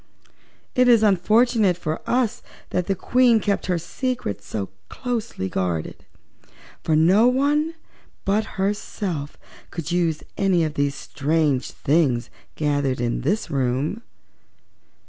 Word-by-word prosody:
"It 250 0 +4
is 235 -3 +6
unfortunate 210 0 +3
for 155 -2 -3
us 245 -3 +1 0.3
that 180 -1 -1
the 195 - +1
Queen 240 +4 +3
kept 200 -2 -1
her 180 -2 +1
secrets 180 - -4
so 100 -3 -3 0.2
closely 235 - -3
guarded, 90 -4 -3 0.8
for 160 - +1
no 185 +9 +5
one 295 +5 +1 0.5
but 210 +2 +2
herself 190 -6 -2 0.3
could 170 -1 -5
use 170 -3 0 0.2
any 190 -4 +3
of 155 -2 -1
these 140 -2 0
strange 150 -2 0
things 135 -6 +1 0.2
gathered 145 -4 0
in 120 -1 -1
this 200 -4 -1
room." 135 - -1
175 Hz, 120 wpm, -23 LUFS, 145-220 Hz, 0.8 s, is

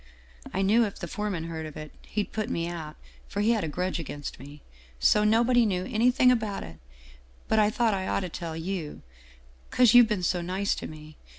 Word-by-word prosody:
I 195 - -1
knew 220 +5 +4
if 205 -3 -3
the 175 - -6
foreman 200 -2 -3
heard 160 -1 -5
of 155 - -10
it, 155 0 -8
he'd 210 -1 -4
put 215 -1 -2
me 170 0 -2
out, 160 -3 -6 0.3
for 205 - -3
he 220 +3 +3
had 220 -3 +1
a - - -2
grudge 180 +4 -2
against 145 -2 -7
me. 145 +3 -12 0.4
So 210 - +4
nobody 235 +3 +4
knew 185 -4 0
anything 250 +3 +3
about 220 -5 -1
it. 80 -1 -11 0.7
But 220 - +2
I 210 -1 +4
thought 225 0 +1
I 190 -1 -2
ought - - 0
to 185 - -4
tell 165 -1 -6
you, 165 -2 -5 0.7
'cause 245 -3 +4
you've 245 -1 +8
been 210 -5 -2
so 175 0 +1
nice 185 +3 -1
to - - -6
me. 155 0 -12
190 Hz, 210 wpm, -27 LUFS, 165-215 Hz, 0.7 s, you've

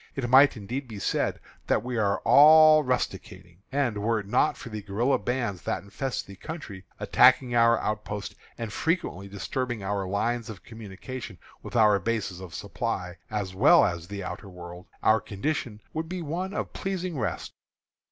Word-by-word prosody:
It 135 -3 -2
might 135 0 +7
indeed 125 +6 -5
be 110 -3 -8
said 100 - -1 0.3
that - - +1
we 125 0 -4
are 100 -3 +1
all 155 +1 +8
rusticating; 95 -8 -4
and, 130 -6 0
were 110 +2 +1
it 100 - -7
not 100 - +2
for 120 - -9
the 110 -1 -5
guerilla 110 +7 0
bands 120 -7 -2
that - - -3
infest 120 +7 -4
the 100 - -11
country, 115 - -8
attacking 125 0 +4
our 115 0 +5
outposts, 105 -1 -4 0.2
and 115 -3 -5
frequently 160 - -1
disturbing 110 +3 -4
our 100 -1 -2
lines 115 +4 -1
of 105 -4 -9
communication 110 0 -8 0.2
with - - -9
our 105 -3 +5
bases 100 -3 -2
of 90 -4 -9
supply 90 0 -4
as 100 -4 -3
well 140 - +6
as 85 -1 -3
the 100 0 -6
outer 90 +2 -7
world, 90 0 -10 0.2
our 110 -1 +4
condition 110 0 -3
would 160 +1 -4
be 180 -1 -4
one 175 +5 -3
of - - -4
pleasing 185 -5 -3
rest. 105 -7 -3
110 Hz, 170 wpm, -27 LUFS, 100-130 Hz, 0.3 s, all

